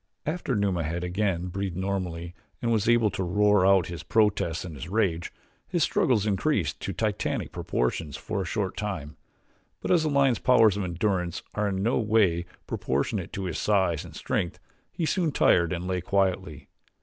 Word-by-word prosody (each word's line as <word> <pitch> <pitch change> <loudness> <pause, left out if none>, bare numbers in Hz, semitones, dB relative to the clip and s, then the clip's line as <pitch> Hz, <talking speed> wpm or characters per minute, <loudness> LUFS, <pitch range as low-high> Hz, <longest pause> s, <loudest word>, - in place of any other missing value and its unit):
After 165 +4 -1
Numa 100 -4 +1
had 85 +3 -3
again 90 -1 -1
breathed 95 -1 -3
normally 90 -3 -3 0.3
and 115 - -1
was 110 -1 +2
able 115 -3 +4
to 95 - -3
roar 105 +1 +3
out 95 -3 +5
his 85 0 -6
protests 100 -6 +1
and 85 - -7
his 75 +3 -7
rage, 95 -5 0 0.4
his 175 -4 +1
struggles 110 -6 +2
increased 105 - 0
to - - -4
Titanic - - -2
proportions 70 +4 -2
for 105 -2 -3
a - - -3
short 95 +2 -2
time; 80 -9 -4 0.6
but - - -3
as 175 -3 +4
a 155 - +1
lion's 140 -4 +3
powers 115 -5 +5
of 100 - -2
endurance 90 0 -1
are 105 0 0
in 95 -1 -1
no 115 - +2
way 100 -6 +2 0.2
proportionate 85 - -2
to 95 - -3
his 90 - -3
size 95 -6 +1
and - - -12
strength 85 - -2 0.3
he 165 - -2
soon 165 -1 +1
tired 85 - +3
and 90 0 -3
lay 90 -1 -1
quietly. 95 -4 -1
95 Hz, 175 wpm, -27 LUFS, 85-105 Hz, 0.6 s, out